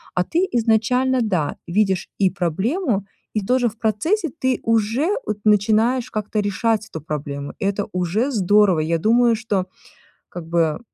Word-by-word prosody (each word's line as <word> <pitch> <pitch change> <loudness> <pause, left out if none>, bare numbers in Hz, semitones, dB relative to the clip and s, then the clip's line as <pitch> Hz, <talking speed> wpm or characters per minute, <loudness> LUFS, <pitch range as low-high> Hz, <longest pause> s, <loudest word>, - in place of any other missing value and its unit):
а 180 - +2
ты 340 - 0
изначально, 245 +3 +2
да, 180 -9 -1
видишь 190 0 0
и 195 -2 +4
проблему, 200 - -1 0.3
и 215 - 0
тоже 250 +1 +2
в 220 - -17
процессе 315 - 0
ты 260 -2 +1
уже, 230 - +1 0.2
от, 210 - -2
начинаешь 220 +4 +2
как-то 215 0 -2
решать 215 +2 0
эту 160 - -7
проблему. 140 -2 -5
Это 200 -1 -1
уже 190 +10 0
здорово, 205 -4 +3
я 165 +2 0
думаю, 235 +4 +3
что 205 -5 -2 0.6
как 175 -2 -8
бы 165 -2 0
215 Hz, 150 wpm, -21 LUFS, 185-235 Hz, 0.6 s, и